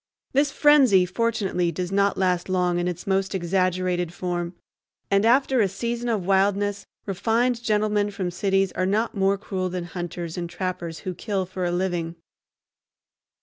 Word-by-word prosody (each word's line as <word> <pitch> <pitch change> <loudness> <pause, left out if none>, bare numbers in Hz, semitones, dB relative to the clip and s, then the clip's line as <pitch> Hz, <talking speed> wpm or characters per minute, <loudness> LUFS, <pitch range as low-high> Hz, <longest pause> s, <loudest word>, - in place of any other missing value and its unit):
This 280 +2 +3
frenzy, 270 -12 +5
fortunately, 190 -3 0
does 180 +2 -4
not 200 0 +2
last 180 -1 0
long 180 -1 +1
in 175 - -1
its 175 -1 -4
most 195 0 0
exaggerated 180 -1 0
form, 175 0 -3 0.6
and 200 +3 +4
after 260 0 +4
a 205 - +3
season 235 +5 -3
of 210 -6 -1
wildness 200 +1 +1 0.2
refined 230 +5 0
gentlemen 210 -2 +1
from 190 -3 -3
cities 195 +1 +1
are 185 - -1
not 215 +4 0
more 195 0 +2
cruel 190 -2 -3
than 180 -1 -4
hunters 175 -1 -5
and 170 -1 -4
trappers 175 -2 -4
who 185 -2 -4
kill 195 +1 -2
for 185 0 -4
a 175 - 0
living. 175 -2 -2
190 Hz, 155 wpm, -24 LUFS, 180-205 Hz, 0.6 s, frenzy